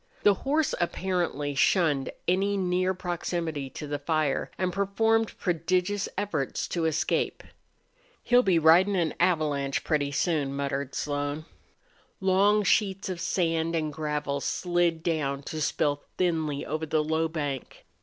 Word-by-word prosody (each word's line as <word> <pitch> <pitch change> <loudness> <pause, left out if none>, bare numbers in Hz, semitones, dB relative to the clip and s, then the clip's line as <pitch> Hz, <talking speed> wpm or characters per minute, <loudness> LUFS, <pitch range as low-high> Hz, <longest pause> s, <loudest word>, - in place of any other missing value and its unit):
The 205 - +6
horse 285 +8 0
apparently 175 -5 -1
shunned 145 -2 +2 0.2
any 195 +3 +2
near 185 0 +1
proximity 170 -5 -3
to 150 - -7
the 145 0 -3
fire, 155 -1 0
and 185 -1 -1
performed 225 +3 +1
prodigious 180 +3 0
efforts 195 -9 -2
to 170 -2 -1
escape. 160 0 0 0.8
"He'll 245 0 +5
be 190 -8 +3
ridin' 170 +5 +5
an 170 -4 +1
avalanche 150 -6 +1
pretty 145 -3 0
soon," 140 -2 0
muttered 140 -1 -3
Slone. 145 +1 -2 0.7
Long 200 +2 +3
sheets 195 0 +1
of 180 -2 -4
sand 165 -2 0
and 155 -2 -1
gravel 150 -2 -2
slid 175 -1 0
down 145 -5 -1
to 155 +2 -5
spill 145 -1 0 0.2
thinly 160 -5 0
over 155 +2 -3
the 155 0 +1
low 160 +1 0
bank. 145 -5 -5
165 Hz, 135 wpm, -27 LUFS, 145-185 Hz, 0.8 s, The